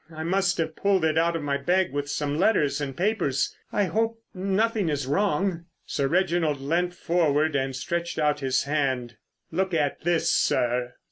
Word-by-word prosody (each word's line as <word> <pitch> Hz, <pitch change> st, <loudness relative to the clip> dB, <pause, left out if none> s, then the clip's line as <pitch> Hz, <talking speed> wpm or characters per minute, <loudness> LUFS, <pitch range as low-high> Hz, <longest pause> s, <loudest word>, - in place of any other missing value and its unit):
I 160 Hz, 0 st, -6 dB
must 185 Hz, +2 st, +1 dB
have 160 Hz, -1 st, -2 dB
pulled 195 Hz, -4 st, +2 dB
it 155 Hz, -1 st, +1 dB
out 165 Hz, +1 st, +2 dB
of 165 Hz, -, -3 dB
my 140 Hz, -1 st, 0 dB
bag 180 Hz, +5 st, +1 dB
with 145 Hz, 0 st, -3 dB
some 145 Hz, +1 st, -2 dB
letters 150 Hz, -8 st, +2 dB
and 135 Hz, -2 st, -4 dB
papers. 175 Hz, -9 st, 0 dB, 0.2 s
I 205 Hz, -, +1 dB
hope—nothing 215 Hz, -1 st, -1 dB
is 145 Hz, -3 st, -1 dB
wrong?" 175 Hz, +2 st, 0 dB, 0.2 s
Sir 140 Hz, -2 st, -1 dB
Reginald 170 Hz, -3 st, +1 dB
leant 175 Hz, +6 st, -1 dB
forward 160 Hz, -3 st, +1 dB
and 135 Hz, -1 st, -1 dB
stretched 170 Hz, +6 st, -3 dB
out 150 Hz, -1 st, +1 dB
his 135 Hz, -2 st, +1 dB
hand. 130 Hz, -5 st, -1 dB, 0.3 s
"Look 185 Hz, +1 st, 0 dB
at 145 Hz, -3 st, 0 dB
this, 175 Hz, 0 st, +1 dB
sir." 125 Hz, 0 st, +1 dB
160 Hz, 165 wpm, -26 LUFS, 140-185 Hz, 0.3 s, pulled